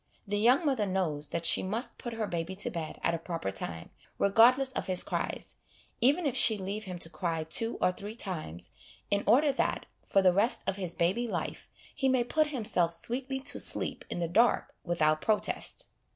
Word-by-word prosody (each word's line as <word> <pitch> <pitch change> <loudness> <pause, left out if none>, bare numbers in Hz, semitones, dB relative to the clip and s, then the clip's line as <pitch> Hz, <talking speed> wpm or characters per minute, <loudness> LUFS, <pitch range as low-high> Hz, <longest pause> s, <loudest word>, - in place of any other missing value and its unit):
The 205 +1 -1
young 250 +9 +4
mother 255 -8 +1
knows 165 -6 -1
that 170 +2 -3
she - - +5
must 215 +6 -3
put 240 - -5
her 225 -1 -2
baby 175 0 -4
to 200 - -2
bed 165 -4 -5
at 170 - +2
a 165 - -2
proper 165 - -4
time, 85 -4 -4 0.3
regardless 250 +6 +4
of - - -4
his 185 -1 +1
cries, - - -4 0.4
even 285 +8 +3
if 275 - 0
she 220 -2 +5
leave 200 +3 -5
him 180 -2 -5
to 170 - -1
cry 165 0 -3
two 225 +9 +1
or - - +3
three 205 +4 -8
times, 155 - -6 0.4
in 200 0 +2
order 280 +7 +5
that, 270 - -1 0.2
for 195 - +2
the 185 -1 +5
rest 210 +7 +2
of 195 - -1
his 180 -3 -4
baby 190 +8 0
life, - - -4 0.2
he 270 -2 0
may 255 -2 +3
put 310 +5 +1
himself 210 - 0
sweetly 260 +8 -2
to - - 0
sleep - - 0
in - - -4
the 170 -1 -1
dark 230 +8 +2
without 155 -3 +1
protest. 220 - -1
200 Hz, 195 wpm, -30 LUFS, 170-240 Hz, 0.4 s, she